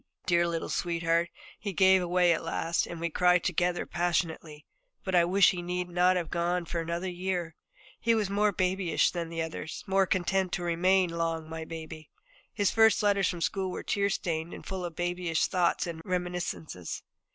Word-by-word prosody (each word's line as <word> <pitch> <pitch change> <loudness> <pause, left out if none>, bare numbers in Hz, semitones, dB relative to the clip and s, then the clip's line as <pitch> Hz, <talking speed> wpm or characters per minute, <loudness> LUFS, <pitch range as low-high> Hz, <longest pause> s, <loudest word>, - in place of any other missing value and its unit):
Dear 175 -1 +3
little 165 -1 -2
sweetheart, 170 0 0 0.3
he 200 -2 -4
gave 190 +1 +5
way 175 0 +4
at 160 - -3
last, 165 +1 -1
and 170 - -7
we 170 0 -2
cried 180 +1 +3
together 180 0 0
passionately. 165 -3 -2 0.4
But 190 - -3
I 175 -1 +5
wish 190 +2 +5
he 180 -2 -4
need 180 0 -3
not 180 +1 +3
have 175 -3 -2
gone 175 0 0
for 170 0 -3
another 170 +3 -3
year. 180 -2 -3 0.4
He 230 0 +2
was 215 -2 +1
more 205 +2 +2
babyish 185 -2 +1
than 170 -2 -4
the 165 -1 -2
others, 160 0 -6
more 195 0 +2
content 185 0 0
to 175 - -2
remain 180 +1 +2
long 165 -1 -2
my 160 0 -6
baby. 160 -1 -8 0.4
His 205 -2 +1
first 220 -1 +4
letters 200 -2 +3
from 175 -2 -4
school 190 +2 -1
were - - -5
tear 200 0 0
stained 165 -3 -2
and - - -11
full 190 -1 -4
of 170 -2 -6
babyish 175 -1 0
thoughts 180 -1 +1
and 165 -2 -6
reminiscences. 180 - -4
175 Hz, 185 wpm, -29 LUFS, 165-185 Hz, 0.4 s, gave